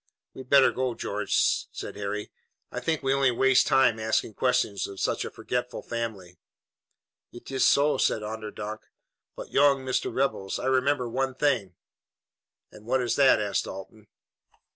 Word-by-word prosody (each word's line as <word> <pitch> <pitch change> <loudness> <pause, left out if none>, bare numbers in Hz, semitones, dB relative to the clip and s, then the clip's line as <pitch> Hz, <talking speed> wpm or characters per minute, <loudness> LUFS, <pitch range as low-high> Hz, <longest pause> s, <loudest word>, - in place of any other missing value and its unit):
"We'd 130 -1 -11
better 140 -1 +6
go, 130 -2 -2
George," 105 -1 0
said - - -7
Harry. 105 +1 -4 0.4
"I - - -4
think 160 -2 -2
we 135 0 +2
only 135 -1 +3
waste 130 +2 +3
time 135 -4 +3
asking 110 0 -1
questions 125 -4 0
of 100 - -10
such - - -1
a - - -5
forgetful 125 0 -4
family." 100 -7 -5 0.9
"It 120 - -11
iss 130 - +1
so," 140 -1 +3
said 110 - +1
Onderdonk; 110 0 -6 0.6
"but, - - -9
young 140 -1 +3
Mister 130 - -1
Rebels, 130 -8 -1
I - - -5
remember 130 0 +1
one 130 +2 -2
thing." 120 - 0 1.0
"And 105 +1 -15
what 130 +2 +2
is 120 - 0
that?" 135 -2 +5
asked 100 -2 -1
Dalton. 105 +2 -10
125 Hz, 155 wpm, -26 LUFS, 105-135 Hz, 1.0 s, better